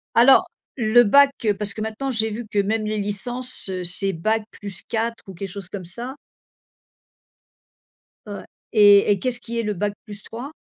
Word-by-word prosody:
Alors. 250 +3 +5 0.3
Le 230 +2 +5
Bac, 280 +6 +5
heu, 210 -2 +2
parce 200 0 -3
que 215 - -7
maintenant 220 +5 -4
j'ai 220 -3 0
vu 230 +2 -6
que 205 - -5
même 215 +2 0
les 215 0 -3
licences, 245 +5 +2
heu, 185 -1 -4
c'est 190 +2 +3
Bac 215 +6 -1
+4 225 +3 -5
ou 190 - -9
quelque 195 +2 -7
chose 195 -1 -9
comme 190 -1 -8
ça? 240 +10 -3 2.1
Ouais, 205 -2 -8 0.3
et 205 -1 +6
et 200 - +1
qu'est-ce 250 +1 -1
qui 235 -1 -5
est - - -1
le 210 -1 -2
Bac 205 +2 -3
+3? 225 +6 -9
215 Hz, 175 wpm, -21 LUFS, 200-235 Hz, 2.1 s, et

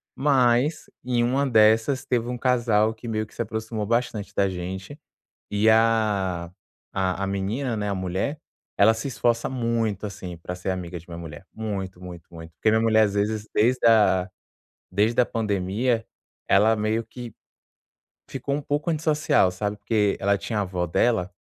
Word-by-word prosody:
mas 135 +2 +2 0.2
em 120 -1 +1
uma 135 +4 +1
dessas 110 +4 +4
teve 120 -1 0
um 125 - -3
casal 115 -4 +2
que 110 +2 -11
meio 110 -1 -1
que 105 - -21
se - - -4
aproximou 110 -1 -4
bastante 115 -3 -1
da 100 - +3
gente, 95 - -6 0.5
eh, 105 +2 +3
a 105 -6 +1 0.5
a 95 0 0
a - - -1
menina, 105 +6 -2
né, 105 -1 -2
a - - 0
mulher, 95 - -2 0.4
ela 110 +3 +6
se 110 - -6
esforça 115 0 0
muito 115 -5 -1
assim, 90 -3 -8
pra 90 +2 -6
ser 90 +1 -5
amiga 90 -1 -4
de 80 - -17
minha 85 - -7
mulher, 80 +1 -9
muito, 100 -4 -5
muito, 85 -2 -11
muito. 80 0 -10
Porque 110 - +1
minha 110 - +3
mulher, 110 -1 +4
as 100 -2 0
vezes, 105 +1 -1
desde 120 +3 +2
a 105 -5 +4 0.6
desde 105 +6 +2
a 120 - +3
pandemia, 110 +2 -1 0.4
ela 105 +3 +5
meio 110 +2 -1
que 120 0 -9 1.0
ficou 135 +1 -3
um 145 - -3
pouco 145 +3 -2
antissocial, 155 - +2
sabe, 100 +2 -3
porque 105 -1 +1
ela 100 +1 +2
tinha 100 +2 -3
a - - +1
vó 90 -1 -2
dela, 95 +1 +1
110 Hz, 170 wpm, -24 LUFS, 95-120 Hz, 1.0 s, ela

